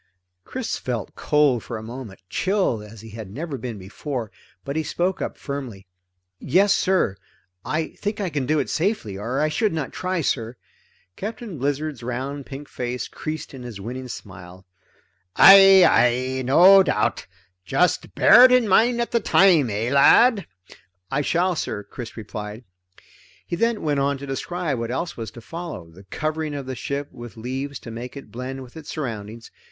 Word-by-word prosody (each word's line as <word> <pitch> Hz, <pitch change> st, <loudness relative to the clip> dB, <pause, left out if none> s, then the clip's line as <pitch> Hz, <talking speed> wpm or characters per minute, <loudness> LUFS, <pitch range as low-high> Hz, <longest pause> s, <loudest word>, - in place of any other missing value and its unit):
Chris 255 Hz, -2 st, -4 dB
felt 120 Hz, -4 st, -4 dB
cold 145 Hz, -5 st, +2 dB
for 120 Hz, -, -6 dB
a 110 Hz, -, -8 dB
moment, 115 Hz, -3 st, -8 dB
chilled 185 Hz, -, 0 dB
as 105 Hz, 0 st, -12 dB
he 110 Hz, -1 st, -11 dB
had 110 Hz, -2 st, -8 dB
never 150 Hz, -, -5 dB
been 120 Hz, -3 st, -6 dB
before, 115 Hz, +4 st, -6 dB, 0.3 s
but 140 Hz, -, -4 dB
he 160 Hz, -, +1 dB
spoke 180 Hz, +4 st, -2 dB
up -, -, -4 dB
firmly. 130 Hz, -9 st, -6 dB, 0.5 s
"Yes 195 Hz, +3 st, +3 dB
sir. 185 Hz, -, +1 dB, 0.5 s
I 155 Hz, +1 st, -2 dB
think 205 Hz, +1 st, -5 dB
I 190 Hz, -4 st, -2 dB
can 140 Hz, -4 st, -2 dB
do 155 Hz, +2 st, +2 dB
it -, -, 0 dB
safely, 165 Hz, -, -1 dB
or 115 Hz, +7 st, -3 dB
I 155 Hz, -, +2 dB
should 205 Hz, +6 st, 0 dB
not 155 Hz, -4 st, -3 dB
try, 185 Hz, -1 st, -2 dB
sir." 120 Hz, -4 st, -2 dB, 0.6 s
Captain 215 Hz, -, -6 dB
Blizzard's 145 Hz, 0 st, -2 dB
round 130 Hz, +3 st, -4 dB
pink 140 Hz, +1 st, -8 dB
face 125 Hz, 0 st, -4 dB
creased 155 Hz, -1 st, -6 dB
in 130 Hz, -, -9 dB
his 120 Hz, -5 st, -8 dB
winning 125 Hz, +5 st, -6 dB
smile. 95 Hz, -5 st, -10 dB, 0.7 s
"Aye, 195 Hz, -1 st, +9 dB
aye. 130 Hz, +2 st, +2 dB
No 180 Hz, +10 st, +7 dB
doubt. 185 Hz, -, 0 dB, 0.4 s
Just 180 Hz, -, 0 dB
bear 240 Hz, +5 st, +8 dB
it 255 Hz, -, +5 dB
in 250 Hz, -3 st, +4 dB
mind 235 Hz, +5 st, +4 dB
at 235 Hz, -, -3 dB
the 235 Hz, -, +2 dB
time, 180 Hz, -, +4 dB
eh 110 Hz, +4 st, -2 dB
lad?" 200 Hz, -, +5 dB, 0.6 s
"I 145 Hz, -, +1 dB
shall 175 Hz, +4 st, +1 dB
sir," 105 Hz, -8 st, -3 dB
Chris 115 Hz, +4 st, -9 dB
replied. 105 Hz, +1 st, -7 dB, 0.8 s
He -, -, -3 dB
then 230 Hz, +4 st, 0 dB
went 145 Hz, -3 st, +1 dB
on 140 Hz, 0 st, +1 dB
to 140 Hz, -, -8 dB
describe 145 Hz, +1 st, -3 dB
what 115 Hz, 0 st, -3 dB
else 170 Hz, +8 st, -3 dB
was 115 Hz, -2 st, -6 dB
to 120 Hz, +2 st, -12 dB
follow 160 Hz, -, -7 dB
the 95 Hz, +4 st, -16 dB
covering 155 Hz, +6 st, -3 dB
of 140 Hz, -2 st, -5 dB
the 130 Hz, -, -5 dB
ship 140 Hz, +3 st, -4 dB
with 120 Hz, -2 st, -11 dB
leaves 130 Hz, +4 st, -4 dB
to 115 Hz, -, -9 dB
make 120 Hz, +4 st, -7 dB
it 140 Hz, -, -11 dB
blend 130 Hz, +2 st, -6 dB
with 125 Hz, -, -15 dB
its 160 Hz, -2 st, -10 dB
surroundings. 115 Hz, -5 st, -6 dB
140 Hz, 175 wpm, -23 LUFS, 115-170 Hz, 0.8 s, Aye